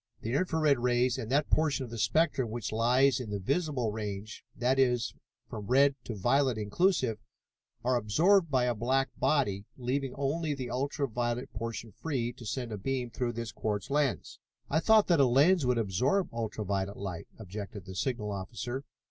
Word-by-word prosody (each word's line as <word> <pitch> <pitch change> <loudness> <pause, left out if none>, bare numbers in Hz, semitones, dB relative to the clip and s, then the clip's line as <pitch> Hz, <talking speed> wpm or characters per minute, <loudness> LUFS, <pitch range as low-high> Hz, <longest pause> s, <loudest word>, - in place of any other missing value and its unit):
The 115 - -3
infra 160 +2 +1
red 145 -4 +3
rays 125 0 +2
and 110 - -5
that 145 +3 +1
portion 150 -4 +2
of 115 - -11
the 115 - -5
spectrum 150 -3 +2
which 115 -1 -4
lies 125 +4 +3
in 125 -4 -6
the 105 - -2
visible 135 - -1
range, 105 -1 -5
that 125 +3 +1
is, 125 -2 +2 0.3
from 105 -3 -7
red 140 +3 +5
to 115 - -4
violet 125 +4 +2
inclusive, 115 - +1 0.6
are 125 +1 +2
absorbed 165 - +3
by 130 -3 +2
a 125 0 +2
black 130 +4 +1
body, 105 -10 +1
leaving 130 +1 -2
only 145 +2 -1
the 130 -3 -5
ultra 140 +2 -1
violet 120 +3 -2
portion 115 +1 -5
free 120 - -3
to 120 - -10
send 125 0 -3
a 105 - -4
beam 125 +2 -2
through 120 +1 -2
this 115 -1 -4
quartz 105 +3 -3
lens." 145 -2 0 0.3
"I 155 - +3
thought 220 +4 +5
that 170 -4 +3
a 140 - +6
lens 145 +4 +4
would 125 -1 +2
absorb 120 - +1
ultra 110 -2 -3
violet 100 +1 -2
light," 95 -4 -5
objected 100 -2 -7
the 95 - -8
signal 105 +1 -2
officer. 115 +7 -5
125 Hz, 180 wpm, -30 LUFS, 110-140 Hz, 0.6 s, a